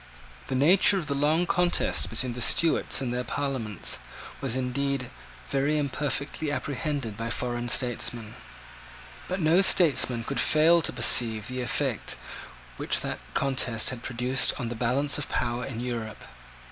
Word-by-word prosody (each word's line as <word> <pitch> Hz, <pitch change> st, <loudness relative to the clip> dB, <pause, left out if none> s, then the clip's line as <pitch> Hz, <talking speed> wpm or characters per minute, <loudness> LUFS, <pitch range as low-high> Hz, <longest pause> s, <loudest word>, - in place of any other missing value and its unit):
The 130 Hz, -, -2 dB
nature 180 Hz, +8 st, +5 dB
of 175 Hz, -, -3 dB
the 140 Hz, -, -2 dB
long 150 Hz, +5 st, +2 dB
contest 180 Hz, -2 st, +2 dB
between 125 Hz, -2 st, -2 dB
the 125 Hz, -, -6 dB
Stuarts 155 Hz, +5 st, +2 dB
and 125 Hz, -2 st, -2 dB
their 125 Hz, 0 st, -2 dB
Parliaments 125 Hz, -6 st, -2 dB, 0.4 s
was 130 Hz, -3 st, -1 dB
indeed 130 Hz, 0 st, -2 dB, 0.4 s
very 140 Hz, +3 st, +1 dB
imperfectly 145 Hz, +1 st, -2 dB
apprehended 145 Hz, -6 st, -3 dB
by 115 Hz, +2 st, -4 dB
foreign 120 Hz, 0 st, -2 dB
statesmen: 120 Hz, -3 st, 0 dB, 0.9 s
but 185 Hz, +1 st, -3 dB
no 165 Hz, +3 st, +4 dB
statesman 140 Hz, -10 st, +3 dB
could 140 Hz, +4 st, -3 dB
fail 165 Hz, +3 st, +5 dB
to -, -, -2 dB
perceive 110 Hz, -4 st, +2 dB
the 125 Hz, 0 st, -4 dB
effect 125 Hz, -, -1 dB, 0.6 s
which -, -, -1 dB
that -, -, -4 dB, 0.2 s
contest 130 Hz, -5 st, +1 dB
had 125 Hz, -2 st, -7 dB
produced 125 Hz, +2 st, 0 dB
on 120 Hz, -, -3 dB
the 120 Hz, -, -5 dB
balance 130 Hz, +6 st, +1 dB
of 145 Hz, -, -5 dB
power 120 Hz, +1 st, -1 dB
in 120 Hz, -4 st, -6 dB
Europe. 120 Hz, -3 st, -5 dB
130 Hz, 145 wpm, -27 LUFS, 120-145 Hz, 0.9 s, nature